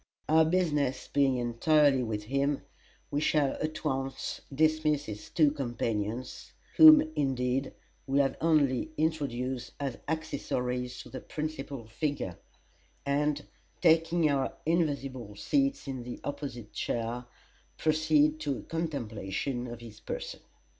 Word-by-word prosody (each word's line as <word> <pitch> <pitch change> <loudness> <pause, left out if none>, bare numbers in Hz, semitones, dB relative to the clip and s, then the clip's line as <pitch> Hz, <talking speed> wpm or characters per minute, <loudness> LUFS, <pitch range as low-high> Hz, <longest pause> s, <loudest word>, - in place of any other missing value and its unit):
Our 160 +1 +5
business 150 -6 +1
being 135 -2 +2
entirely 135 +4 +3
with 110 -3 -3
him, 140 +5 0 0.5
we 145 - 0
shall 150 -3 +2
at 155 +1 -3
once 135 -2 -2
dismiss 155 0 +2
his 105 -1 -7
two 150 -3 +4
companions 120 -4 -3 0.2
whom, 310 -1 +11
indeed, 130 -1 0 0.3
we 135 +1 +1
have 140 -1 +3
only 150 -4 +3
introduced 130 -5 -1
as 135 -4 -3
accessories 125 -5 -2
to - - -13
the 130 - -6
principal 140 -4 -5
figure 115 - -3 0.7
and, 145 +1 0 0.3
taking 165 0 +4
our 140 -2 0
invisible 140 -9 -1
seats 275 - 0
in 130 -2 -4
the 120 0 -7
opposite 130 -6 -6
chair, 120 +1 -2 0.5
proceed 155 -1 +3
to 145 -4 -1
a - - -9
contemplation 125 - -3
of 120 -1 -8
his 110 -2 -11
person. - - -5
140 Hz, 120 wpm, -30 LUFS, 125-155 Hz, 0.7 s, whom